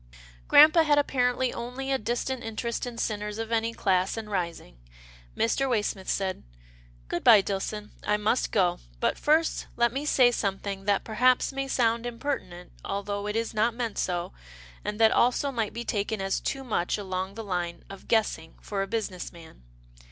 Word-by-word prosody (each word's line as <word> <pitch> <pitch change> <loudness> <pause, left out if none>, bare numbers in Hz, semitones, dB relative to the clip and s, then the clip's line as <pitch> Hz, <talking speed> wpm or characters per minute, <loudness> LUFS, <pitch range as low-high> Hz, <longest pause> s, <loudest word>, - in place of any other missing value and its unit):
Grampa 310 +2 +8
had 300 -2 +3
apparently 255 -3 +1
only 250 +3 -5
a 265 - +1
distant 240 +3 -2
interest 230 +2 -3
in 240 -1 -7
sinners 210 -2 -2
of 225 0 -4
any 230 0 +1
class, 190 -2 +1
and 215 -1 -6
rising, 170 - -4 0.6
Mr. 270 +4 +1
Waysmith 205 -5 -1
said, 190 -1 -1 0.4
" - - -27
Good 175 - -3
bye 220 -5 +8
Dillson, 205 +2 -4
I 210 - +1
must 215 +4 0
go, 180 -4 +2 0.2
but - - 0
first 315 +2 +2
let 235 0 +3
me 280 +3 -3
say 255 -5 +5
something 195 -2 -3
that 205 -1 +2
perhaps 250 +4 +2
may 275 0 -2
sound 235 -2 +1
im 240 -1 -6
pertinent, 180 -11 -4
although 200 +1 -3
it 210 - -3
is 230 0 -1
not 225 +2 +1
meant 235 -3 -3
so, 175 - -2 0.5
and 210 +1 -4
that 225 -1 +6
also 250 +3 +2
might 225 -5 -2
be 235 - -5
taken 210 +1 -1
as 195 0 -1
too 270 - -3
much 210 -8 -1
along 190 -1 -4
the 225 - -6
line 175 -4 -3
of 195 - -11
guess 220 -2 +2
ing 160 0 -16
for 200 -2 -3
a 195 - -2
business 205 -4 -3
man. 165 - -14
220 Hz, 180 wpm, -27 LUFS, 195-245 Hz, 0.6 s, Grampa